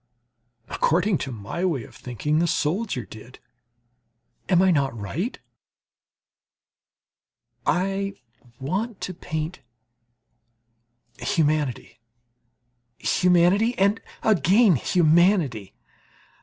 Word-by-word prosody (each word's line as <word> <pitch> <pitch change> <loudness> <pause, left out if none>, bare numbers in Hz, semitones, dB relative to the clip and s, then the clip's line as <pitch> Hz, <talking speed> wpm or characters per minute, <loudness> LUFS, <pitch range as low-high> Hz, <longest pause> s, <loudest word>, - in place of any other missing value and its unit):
According 180 +3 +1
to 135 - -4
my 115 - -5
way 160 -10 0
of - - -15
thinking, 150 +5 -2
the 170 - +2
soldier 160 - -1
did; 110 +3 -13 1.1
am 180 -3 +4
I 190 - +4
not 135 -6 0
right? 160 - -4 2.3
I 195 +2 0 0.4
want 195 - -3
to 185 - -4
paint 160 0 -5 1.6
humanity, 150 -7 -1 1.0
humanity 180 +6 +3
and 200 +3 +2 0.2
again 200 - +4
humanity. 160 - +2
170 Hz, 80 wpm, -24 LUFS, 140-195 Hz, 2.3 s, am